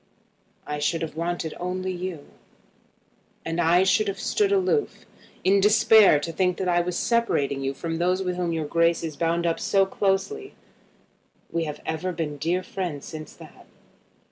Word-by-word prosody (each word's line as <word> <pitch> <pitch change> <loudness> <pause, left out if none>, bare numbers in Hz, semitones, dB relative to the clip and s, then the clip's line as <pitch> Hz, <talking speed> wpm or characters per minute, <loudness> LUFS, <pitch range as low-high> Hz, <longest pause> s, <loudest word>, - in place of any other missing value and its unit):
"I 150 0 -4
should 165 +3 0
have 160 - -5
wanted 170 -1 -3
only 185 +1 -3
you." 180 -4 -5 1.2
"And 165 +1 -1
I 175 +2 +4
should 205 +2 +2
have 195 -1 -3
stood 410 -2 +1
aloof, 400 +3 0 0.4
in 195 +2 +4
despair 210 -4 +6
to 165 - -4
think 180 +1 0
that 190 - -2
I 175 -1 +3
was 175 0 -3
separating 145 - 0
you 135 0 -2
from 165 +2 -4
those 180 +2 +1
with 180 -1 -2
whom 175 -1 -1
your 160 -2 -2
Grace 170 +2 +2
is 160 -2 -4
bound 170 +2 0
up 165 -1 0
so 195 -1 +2
closely. 205 - -1 1.0
We 165 -1 -1
have 150 -1 -6
ever 160 +4 -2
been 160 -4 -4
dear 175 +5 -1
friends 175 -7 -5
since 155 -2 -9
that." - - -15
175 Hz, 170 wpm, -25 LUFS, 165-190 Hz, 1.2 s, despair